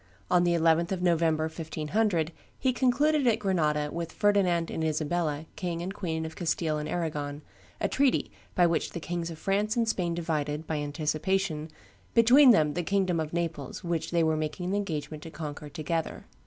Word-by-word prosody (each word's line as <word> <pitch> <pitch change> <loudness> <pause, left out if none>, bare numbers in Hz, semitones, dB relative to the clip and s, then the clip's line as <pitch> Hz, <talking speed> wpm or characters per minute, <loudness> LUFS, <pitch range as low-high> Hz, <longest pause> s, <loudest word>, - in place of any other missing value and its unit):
On 180 -1 +5
the 175 -1 +3
11th 165 +1 +3
of 185 -2 -2
November, 165 -3 +2
1500, 160 +2 -1 0.3
he 260 -1 +1
concluded 270 +3 +2
at 225 -2 +4
Grenada 155 -7 0
"with 165 -1 -4
Ferdinand 185 -5 +2
and 160 - -2
Isabella, 155 0 -1
King 170 -2 -3
and 190 +2 -4
Queen 160 -5 -3
of 160 0 -7
Castile 160 -3 -1
and 150 0 -4
Arragon," 150 -4 -3 0.4
a - - +1
treaty, 275 -2 +1 0.2
by 175 - +5
which 170 -1 0
the 170 - -4
Kings 170 0 -3
of 165 - -7
France 205 +5 0
and 230 -1 +2
Spain 175 -6 0
divided, 155 -2 -2
by 155 - -2
anticipation, 155 +2 -1 0.5
between 250 +4 +7
them 155 -10 +5
the 175 - -1
kingdom 185 -1 +1
of 155 -1 -3
Naples, 165 -5 -3
which 165 -2 -2
they 170 -1 +2
were 160 0 +2
making 155 +4 -3
an - - +1
engagement 155 -6 -3
to 165 - -8
conquer 150 -2 -7
together. 160 +2 -3
165 Hz, 180 wpm, -28 LUFS, 155-185 Hz, 0.5 s, between